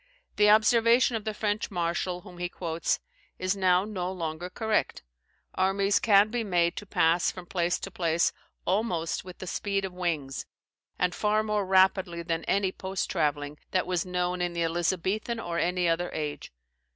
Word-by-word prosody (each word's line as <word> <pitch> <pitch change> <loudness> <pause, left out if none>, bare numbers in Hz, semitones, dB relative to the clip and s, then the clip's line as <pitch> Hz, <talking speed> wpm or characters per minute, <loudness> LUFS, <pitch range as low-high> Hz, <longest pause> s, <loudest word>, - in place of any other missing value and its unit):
The 210 0 +5
observation 230 +3 +5
of 220 -1 -4
the 215 - -2
French 210 0 -1
marshal, 175 -1 -2
whom 180 -3 -13
he 175 0 -2
quotes, 165 -2 -2 0.4
is 185 +1 0
now 185 -1 +3
no 185 -4 -3
longer 170 -1 -4
correct. 220 +2 -1 0.5
Armies 195 +1 +2
can 210 0 +5
be 240 -1 -1
made 175 -4 +1
to 205 - -6
pass 165 0 +3
from 180 -2 -8
place 175 0 0
to 195 - -7
place 170 -2 +1 0.3
almost 180 -4 0
with 180 -1 -10
the - - -7
speed 195 +2 -1
of 190 - -6
wings, 160 -7 -3 0.5
and 180 0 +1
far 215 0 +1
more 210 -2 -1
rapidly 190 -2 +3
than 165 -1 -2
any 195 -1 +1
post 190 0 -4
travelling 150 -3 -1
that 185 - +1
was 180 -2 0
known 180 0 -1
in 175 -1 -1
the 170 0 0
Elizabethan 185 +7 -1
or 170 -5 -3
any 180 0 +1
other 170 +1 +1
age. 150 -1 -4
180 Hz, 170 wpm, -28 LUFS, 170-200 Hz, 0.5 s, The